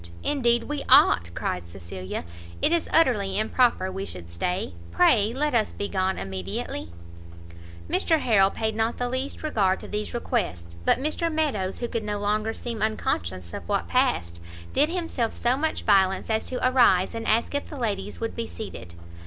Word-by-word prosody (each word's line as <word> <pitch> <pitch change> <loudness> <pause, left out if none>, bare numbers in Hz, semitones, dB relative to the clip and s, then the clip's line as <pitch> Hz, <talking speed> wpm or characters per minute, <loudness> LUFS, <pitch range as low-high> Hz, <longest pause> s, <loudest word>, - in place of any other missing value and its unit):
indeed 240 -5 +2
we 295 -1 -4
ought!" 255 - +6
cried 90 - -2
Cecilia; 90 +1 -7 0.4
"it - - +3
is 340 -1 +1
utterly 210 -11 +3
improper 220 -3 +2
we 195 +1 -4
should 85 - -8
stay; 180 - -2 0.2
pray 205 - +4
let 295 +4 -1
us 225 -3 +1
be 205 - -3
gone 190 -1 0
immediately." 95 -2 -5 1.0
Mr 320 - +2
Harrel 200 -7 +4
paid 220 +1 -2
not 225 +1 0
the 245 - -1
least 260 +5 -3
regard 200 -11 +1
to - - -9
these 210 +2 -4
requests; 85 - -2
but - - +4
Mr 310 +4 -1
Meadows, 275 -12 -1
who 240 - -1
could 230 -1 -3
no 210 -1 -2
longer 210 +2 0
seem 230 0 -5
unconscious 90 - -2
of - - -7
what - - 0
passed, 85 0 0 0.3
did 295 +3 +4
himself 330 -10 -2
so 245 +1 +1
much 315 +3 -1
violence 195 0 +3
as 220 0 0
to 255 0 0
arise, 240 -8 +4
and 230 0 -4
ask 230 +5 +2
if 285 - -3
the 295 - -7
ladies 210 -6 -3
would 225 0 -3
be 230 -1 -3
seated. 90 - -8
215 Hz, 175 wpm, -25 LUFS, 185-250 Hz, 1.0 s, ought